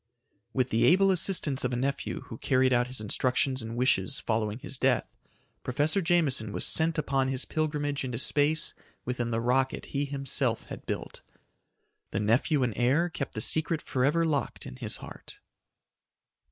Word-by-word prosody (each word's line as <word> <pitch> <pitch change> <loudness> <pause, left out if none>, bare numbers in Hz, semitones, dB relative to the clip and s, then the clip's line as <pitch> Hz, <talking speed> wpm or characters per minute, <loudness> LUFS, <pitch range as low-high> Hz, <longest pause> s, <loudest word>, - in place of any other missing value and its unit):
With 130 -1 0
the 110 - +3
able 195 +2 +5
assistance 170 -6 0
of 125 -1 -1
a - - +1
nephew, 135 +3 -2
who 115 - -10
carried 130 -1 +3
out 120 0 +3
his 130 -1 -6
instructions 130 +4 0
and 115 +1 -6
wishes 120 -7 +1
following 110 -1 -1
his 130 +1 -5
death, 130 -1 +1 0.5
Professor 150 +9 +1
Jameson 155 - +1
was - - 0
sent 165 +1 +3
upon 135 -3 +1
his 130 0 0
pilgrimage 150 -2 -1
into 125 -3 -3
space 150 +4 +1 0.3
within 125 -1 -2
the 115 -1 0
rocket 130 +3 +1
he 140 0 0
himself 135 -4 -2
had - - -8
built. - - -5 0.9
The - - -2
nephew 125 +7 +2
and 120 -3 0
heir 135 - +2
kept 135 -4 -5
the 110 - -2
secret 160 +5 +2
forever 150 +5 +1
locked 150 -4 -1
in 130 -1 -8
his 115 -5 -4
heart. - - -11
130 Hz, 165 wpm, -29 LUFS, 120-150 Hz, 0.9 s, able